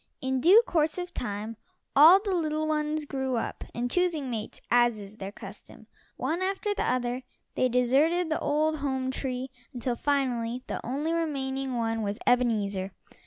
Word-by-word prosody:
In 260 Hz, -1 st, -1 dB
due 395 Hz, -, +7 dB
course 315 Hz, -6 st, +1 dB
of 355 Hz, 0 st, -5 dB
time 215 Hz, 0 st, -4 dB, 0.4 s
all 320 Hz, +7 st, +9 dB
the 395 Hz, -1 st, -2 dB
little 310 Hz, -3 st, 0 dB
ones 305 Hz, 0 st, -1 dB
grew 265 Hz, -2 st, -2 dB
up, 230 Hz, -, -3 dB
and 245 Hz, +1 st, -2 dB
choosing 330 Hz, -7 st, 0 dB
mates, 220 Hz, -2 st, -5 dB
as 240 Hz, -1 st, +4 dB
is 205 Hz, +1 st, -10 dB
their 195 Hz, -1 st, -6 dB
custom, -, -, -12 dB, 0.3 s
one 340 Hz, +3 st, -1 dB
after 390 Hz, +2 st, -1 dB
the -, -, -2 dB
other 250 Hz, 0 st, -1 dB, 0.3 s
they 255 Hz, -, +1 dB
deserted 290 Hz, +8 st, +2 dB
the 310 Hz, -, +1 dB
old 310 Hz, +2 st, +1 dB
home 265 Hz, -2 st, -1 dB
tree 260 Hz, -1 st, -4 dB, 0.2 s
until 245 Hz, 0 st, -1 dB
finally 250 Hz, -3 st, -1 dB
the -, -, -5 dB
only 290 Hz, +7 st, -2 dB
remaining 270 Hz, -5 st, -2 dB
one 225 Hz, -1 st, -1 dB
was 205 Hz, 0 st, -2 dB
Ebenezer. 205 Hz, -6 st, +1 dB
265 Hz, 165 wpm, -28 LUFS, 240-310 Hz, 0.4 s, all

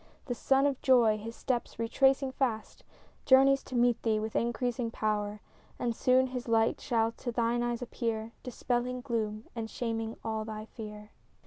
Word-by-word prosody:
The 245 Hz, -, -2 dB
sun 270 Hz, +3 st, +2 dB
of 280 Hz, -2 st, 0 dB
joy, 235 Hz, -5 st, +4 dB
his 230 Hz, +2 st, -7 dB
steps 245 Hz, -2 st, -2 dB
retracing 265 Hz, +4 st, +2 dB
fast, 245 Hz, -5 st, -2 dB, 0.4 s
Journeys 270 Hz, 0 st, +6 dB
to 255 Hz, -, -7 dB
meet 240 Hz, -1 st, +3 dB
thee 220 Hz, -2 st, +1 dB
with 220 Hz, 0 st, -4 dB
increasing 240 Hz, 0 st, 0 dB
power; 210 Hz, -2 st, -2 dB, 0.4 s
And 235 Hz, -2 st, -1 dB
soon 255 Hz, +2 st, +4 dB
his 250 Hz, -1 st, -5 dB
light 225 Hz, 0 st, +2 dB
shall 225 Hz, -3 st, +1 dB
to 240 Hz, +1 st, -5 dB
thine 235 Hz, 0 st, +1 dB
eyes 240 Hz, 0 st, -1 dB
appear, 230 Hz, -2 st, -3 dB
Dispelling 250 Hz, 0 st, -2 dB
gloom 220 Hz, -4 st, -2 dB
and 225 Hz, -1 st, -4 dB
shaming 225 Hz, -1 st, -3 dB
all 220 Hz, -1 st, -2 dB
thy 215 Hz, 0 st, -6 dB
fear. 210 Hz, -2 st, -9 dB
235 Hz, 160 wpm, -30 LUFS, 220-250 Hz, 0.4 s, Journeys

